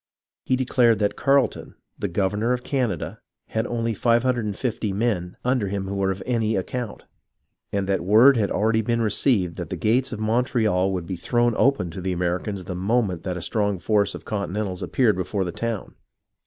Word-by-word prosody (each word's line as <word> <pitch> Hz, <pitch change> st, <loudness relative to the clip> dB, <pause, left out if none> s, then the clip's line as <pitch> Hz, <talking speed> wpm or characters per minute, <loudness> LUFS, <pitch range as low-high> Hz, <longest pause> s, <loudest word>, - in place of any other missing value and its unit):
He 130 Hz, -, +1 dB
declared 125 Hz, -3 st, +3 dB
that 105 Hz, 0 st, 0 dB
Carleton, 140 Hz, -1 st, +1 dB, 0.2 s
the 100 Hz, -, -1 dB
governor 105 Hz, +6 st, 0 dB
of 125 Hz, -1 st, -3 dB
Canada, 130 Hz, -6 st, -2 dB, 0.3 s
had 110 Hz, +1 st, -1 dB
only 115 Hz, -1 st, -1 dB
550 115 Hz, -2 st, 0 dB
men 95 Hz, -5 st, -1 dB
under 125 Hz, -5 st, +1 dB
him 95 Hz, 0 st, -3 dB
who 100 Hz, -, -4 dB
were 100 Hz, -1 st, +1 dB
of 95 Hz, 0 st, -3 dB
any 115 Hz, -3 st, 0 dB
account, 115 Hz, +4 st, -4 dB, 0.7 s
and 100 Hz, -1 st, -1 dB
that 95 Hz, -3 st, 0 dB
word 110 Hz, +9 st, +6 dB
had 105 Hz, -4 st, +1 dB
already 110 Hz, +2 st, +2 dB
been 115 Hz, +1 st, 0 dB
received 105 Hz, -5 st, +1 dB
that 85 Hz, -4 st, -5 dB
the -, -, -4 dB
gates 120 Hz, +4 st, +1 dB
of 120 Hz, -, -5 dB
Montreal 110 Hz, -4 st, +1 dB
would 90 Hz, -3 st, -3 dB
be 95 Hz, 0 st, -4 dB
thrown 120 Hz, +6 st, +1 dB
open 130 Hz, -11 st, +2 dB
to 95 Hz, -, -7 dB
the 95 Hz, 0 st, -1 dB
Americans 90 Hz, +3 st, -2 dB
the 90 Hz, -, -5 dB
moment 95 Hz, -1 st, 0 dB
that 90 Hz, -1 st, -3 dB
a 85 Hz, -, -5 dB
strong 105 Hz, -1 st, 0 dB
force 100 Hz, +2 st, +1 dB
of -, -, -10 dB
Continentals 100 Hz, -2 st, -3 dB
appeared 115 Hz, -7 st, +2 dB
before 95 Hz, +2 st, -1 dB
the 90 Hz, -, -3 dB
town. 115 Hz, +2 st, -4 dB
105 Hz, 180 wpm, -24 LUFS, 95-120 Hz, 0.7 s, word